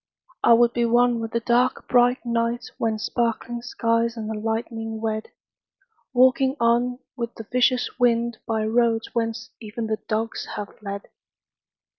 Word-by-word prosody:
I 235 - +7
would 235 0 +5
be 240 - +1
one 240 0 +3
with 225 0 -3
the 235 - -1
dark 245 +2 +1
bright 245 +1 +3
night 235 0 -1
When 225 -1 0
sparkling 235 +2 -2
skies 230 -1 0
and 220 -1 -4
the 220 - -3
lightning 225 +1 -3
wed— 220 0 -2 0.8
Walking 260 +1 +4
on 240 +1 +2 0.2
with 235 -1 -4
the 225 - -7
vicious 250 +1 +2
wind 235 -1 +2
By 220 -1 0
roads 225 0 +1
whence 230 +1 -2
even 225 +1 -5
the 220 -1 -2
dogs 220 +1 -2
have 205 -1 -6
fled. 200 -1 -5
235 Hz, 150 wpm, -24 LUFS, 225-240 Hz, 0.8 s, I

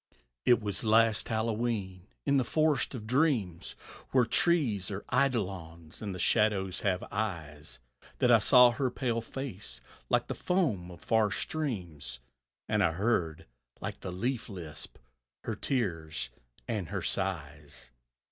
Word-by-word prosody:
It 120 - +6
was 100 0 -3
last 110 0 +4
Hallowe'en 110 -4 -1 0.2
in 140 -1 +3
the 130 - +3
forest 155 +1 +1
of 110 -4 -6
dreams, 115 - +1 0.3
Where 130 -2 +4
trees 120 - +2
are 100 0 -5
eidolons 95 - -1
and 100 -4 -4
shadows 95 -3 +2
have 95 -2 0
eyes, 80 -8 -4 0.4
That - - +4
I - - +8
saw 125 -1 +7
her 130 +3 0
pale 120 -2 -1
face 110 - -6 0.3
like - - +3
the - - -3
foam 135 - 0
of 85 -1 -11
far 110 -2 +3
streams, 90 - -4 0.5
And 105 -1 +2
heard, 85 -3 +1 0.3
like - - -5
the 95 - -5
leaf 120 +8 -2
lisp, 85 -6 -8 0.5
her - - -3
tears 80 - -2 0.4
and 105 -7 -2
her - - -3
sighs. 75 -8 -3
105 Hz, 130 wpm, -30 LUFS, 90-120 Hz, 0.5 s, I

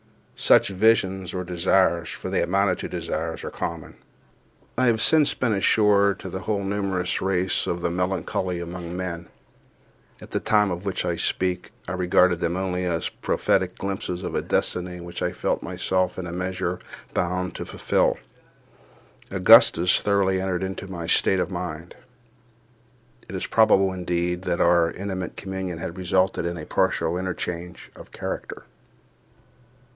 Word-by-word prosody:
Such - - +4
visions 95 -3 +2
or 90 - -2
desires—for 90 0 +1
they - - +1
amounted 95 +1 +1
to - - -5
desires—are 80 -1 -4
common, 85 -2 -5 0.8
I 130 +1 +2
have 115 -2 +3
since 155 +4 +4
been 120 -4 0
assured, 100 -1 +3
to 95 - -6
the 95 - -5
whole 100 0 -2
numerous 95 -2 -1
race 95 -1 0
of 85 0 -2
the 85 - 0
melancholy 90 0 -1
among 85 0 -6
men—at 85 -2 -11
the - - 0
time 105 -2 +2
of 90 +1 -4
which 95 -2 -2
I 85 -1 0
speak 90 +1 -1 0.2
I - - -4
regarded 90 -1 +3
them 85 +1 -1
only 90 -1 -1
as 85 -2 -1
prophetic 95 -1 0
glimpses 95 -2 -4
of - - -4
a - - 0
destiny 90 0 -2
which 85 0 -7
I 90 - 0
felt - - -1
myself 95 -1 -1
in 95 - -4
a 85 - -5
measure 90 0 -2 0.3
bound 90 +1 -1
to - - -5
fulfil. - - +1 1.1
Augustus 90 -2 +6
thoroughly 95 -2 +2
entered 95 -1 -1
into 95 +1 -5
my 85 -3 -6
state 95 +3 +2
of 90 - -1
mind. 85 -2 -5 1.4
It 95 - -6
is 95 - -2
probable, 95 -4 +4
indeed, 90 -1 -1
that 85 - -1
our 85 -1 +4
intimate 95 0 -5
communion 95 -3 -4
had 85 +2 -6
resulted 95 +1 +1
in 85 0 -2
a 80 - -7
partial 85 +3 0
interchange 90 -2 -5
of - - -12
character. - - -6
90 Hz, 150 wpm, -24 LUFS, 85-95 Hz, 1.4 s, Augustus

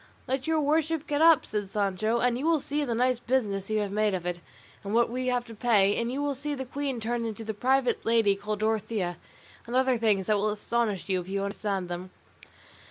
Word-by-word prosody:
"Let 265 +1 -2
your 320 -1 +2
worship 315 +1 +1
get 295 +1 -1
up," 330 -2 +6
said 205 -2 -3
Sancho, 210 +2 0
"and 245 -1 +2
you 270 +6 -2
will 330 -2 +3
see 290 +2 -2
the 240 -5 -1
nice 250 +1 +2
business 210 -7 -1
you 215 -1 +1
have 205 -1 -3
made 210 -1 +1
of 175 -2 -5
it, 175 0 -2 0.4
and 200 +2 -2
what 235 0 +3
we 255 +1 -2
have 245 -1 0
to 230 - -10
pay; 205 -3 +3
and 235 +1 -1
you 280 +3 -2
will 290 -1 0
see 290 +2 -4
the 265 -1 -5
queen 270 -1 -3
turned 230 +1 -2
into 225 0 -6
a 220 - -1
private 255 +4 +1
lady 225 -3 +3
called 210 +1 -4
Dorothea, 215 -5 -1 0.5
and 240 - -4
other 260 -2 +3
things 210 -4 +2
that 210 +1 +2
will 210 +1 +1
astonish 210 -1 -1
you, 185 -2 0
if 180 - -11
you 195 0 -1
understand 200 -2 -2
them." 175 +1 -6
230 Hz, 230 wpm, -28 LUFS, 205-260 Hz, 0.5 s, up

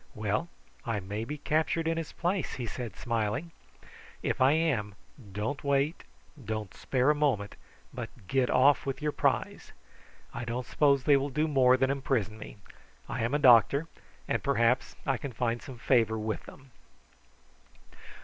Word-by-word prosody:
"Well; 105 +10 -1 0.3
I 115 -3 -2
may 100 +4 -5
be 150 +5 -5
captured 160 +2 0
in 165 - +1
his 165 -2 -4
place!" 180 +2 -2
he 125 - -4
said 115 0 -6
smiling. 115 +6 -2 0.7
"If - - -1
I 130 +2 +6
am, 135 -11 0 0.4
don't 110 +10 -3
wait, 140 +3 0 0.4
don't 110 -2 -4
spare 130 +2 +1
a - - +3
moment, 130 -10 0 0.4
but - - -5 0.2
get 130 -2 +1
off 135 +2 +4
with 135 - -2
your 150 0 -1
prize. - - -1 0.6
I 120 - -5
don't 120 +2 -3
suppose 140 0 +2
they 140 0 +5
will 140 +1 -1
do 150 +4 0
more 130 -3 +4
than 130 +1 +2
imprison 130 -6 -1
me. 110 - -10 0.5
I - - -3
am 120 +5 0
a 145 - +1
doctor, 130 +5 +6 0.4
and - - 0
perhaps 125 -2 +1
I 135 -2 +1
can 135 +1 -6
find 120 0 -1
some 130 -4 -10
favour 115 -3 +2
with 110 0 -3
them." 130 -1 -14
130 Hz, 160 wpm, -29 LUFS, 115-145 Hz, 0.7 s, I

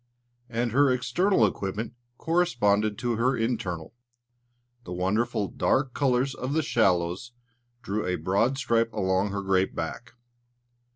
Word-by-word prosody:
And 120 0 -1
her 140 +4 +4
external 125 - +2
equipment 105 +4 -3 0.2
corresponded 110 - +1
to 120 -1 -1
her 130 +3 +1
internal. 110 -9 -2 0.9
The 90 - -7
wonderful, 100 +4 0
dark 130 -2 0
colours 130 -1 +1
of 130 +3 -4
the 160 0 +1
shallows 90 0 +1 0.5
drew 105 +2 -2
a 90 - 0
broad 100 +9 +1
stripe 115 -4 +1
along 95 -1 +1
her 100 0 -3
great 95 0 +1
back. 80 +8 -5
115 Hz, 125 wpm, -27 LUFS, 95-125 Hz, 0.9 s, her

